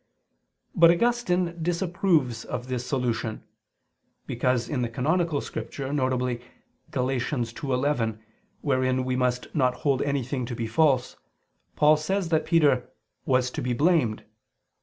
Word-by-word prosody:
But 170 Hz, -1 st, +6 dB
Augustine 180 Hz, -4 st, +1 dB
disapproves 170 Hz, -, +1 dB
of 125 Hz, +1 st, -5 dB
this 125 Hz, -1 st, -3 dB
solution: 120 Hz, -4 st, -2 dB, 0.8 s
because 120 Hz, -1 st, 0 dB
in 125 Hz, 0 st, -2 dB
the 120 Hz, -, -1 dB
canonical 155 Hz, +5 st, 0 dB
Scripture 135 Hz, -2 st, -5 dB
(viz. 130 Hz, -3 st, 0 dB, 0.5 s
Gal. 125 Hz, -, -1 dB
2:11), 125 Hz, -1 st, -1 dB, 0.4 s
wherein 130 Hz, -2 st, +1 dB
we 130 Hz, 0 st, -1 dB
must 125 Hz, -1 st, -1 dB
not 130 Hz, -4 st, +2 dB
hold 135 Hz, -2 st, +2 dB
anything 135 Hz, -3 st, -1 dB
to 120 Hz, -, -4 dB
be 115 Hz, -, -3 dB
false, 130 Hz, +2 st, +2 dB, 0.6 s
Paul 150 Hz, +1 st, +5 dB
says 180 Hz, +4 st, -1 dB
that 160 Hz, -2 st, +1 dB
Peter 145 Hz, -7 st, +3 dB, 0.4 s
"was 130 Hz, -1 st, +2 dB
to -, -, -4 dB
be 125 Hz, -, -1 dB
blamed." 145 Hz, -5 st, +2 dB
130 Hz, 125 wpm, -26 LUFS, 125-160 Hz, 0.8 s, But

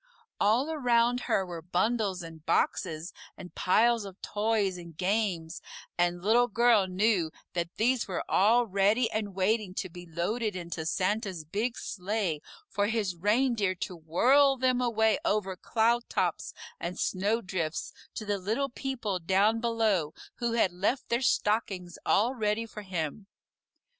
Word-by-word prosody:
All 240 Hz, +9 st, +2 dB
around 245 Hz, -4 st, +2 dB
her 190 Hz, -, +2 dB
were 170 Hz, -2 st, -7 dB
bundles 190 Hz, +2 st, 0 dB
and 165 Hz, -2 st, -11 dB
boxes 165 Hz, -1 st, 0 dB, 0.2 s
and 180 Hz, -, -10 dB
piles 230 Hz, +4 st, +3 dB
of 195 Hz, -1 st, -10 dB
toys 210 Hz, -2 st, 0 dB
and 170 Hz, -3 st, -11 dB
games, 185 Hz, -4 st, -1 dB, 0.3 s
and 175 Hz, 0 st, 0 dB
Little 235 Hz, +4 st, +4 dB
Girl 230 Hz, -3 st, +4 dB
knew 185 Hz, -2 st, +1 dB, 0.2 s
that 170 Hz, -1 st, -3 dB
these 245 Hz, +2 st, +1 dB
were 185 Hz, -3 st, -3 dB
all 230 Hz, +5 st, +4 dB
ready 205 Hz, +4 st, +2 dB
and 210 Hz, -3 st, -3 dB
waiting 195 Hz, 0 st, 0 dB
to 185 Hz, -, -3 dB
be 175 Hz, +1 st, -11 dB
loaded 205 Hz, +6 st, -2 dB
into 170 Hz, -3 st, -5 dB
Santa's 190 Hz, -2 st, -1 dB
big 215 Hz, +9 st, -2 dB
sleigh 190 Hz, -5 st, -2 dB, 0.3 s
for 205 Hz, 0 st, 0 dB
his 210 Hz, -5 st, -1 dB
reindeer 210 Hz, +1 st, +1 dB
to 180 Hz, +1 st, -5 dB
whirl 260 Hz, -, +4 dB
them 255 Hz, -1 st, +2 dB
away 220 Hz, -3 st, +2 dB
over 195 Hz, -3 st, 0 dB
cloudtops 235 Hz, +5 st, 0 dB, 0.3 s
and 175 Hz, +1 st, -4 dB
snowdrifts 185 Hz, -5 st, -1 dB, 0.2 s
to 215 Hz, -, -5 dB
the 205 Hz, -1 st, -1 dB
little 225 Hz, +9 st, -1 dB
people 240 Hz, -7 st, -3 dB
down 195 Hz, +6 st, +2 dB
below 220 Hz, -9 st, +1 dB, 0.2 s
who 235 Hz, -1 st, -1 dB
had 225 Hz, -5 st, +3 dB
left 200 Hz, +9 st, -1 dB
their 235 Hz, +2 st, +1 dB
stockings 205 Hz, -7 st, 0 dB
all 230 Hz, +6 st, +3 dB
ready 220 Hz, -2 st, -1 dB
for 215 Hz, -1 st, -9 dB
him. 185 Hz, 0 st, -4 dB
205 Hz, 145 wpm, -29 LUFS, 180-230 Hz, 0.3 s, Little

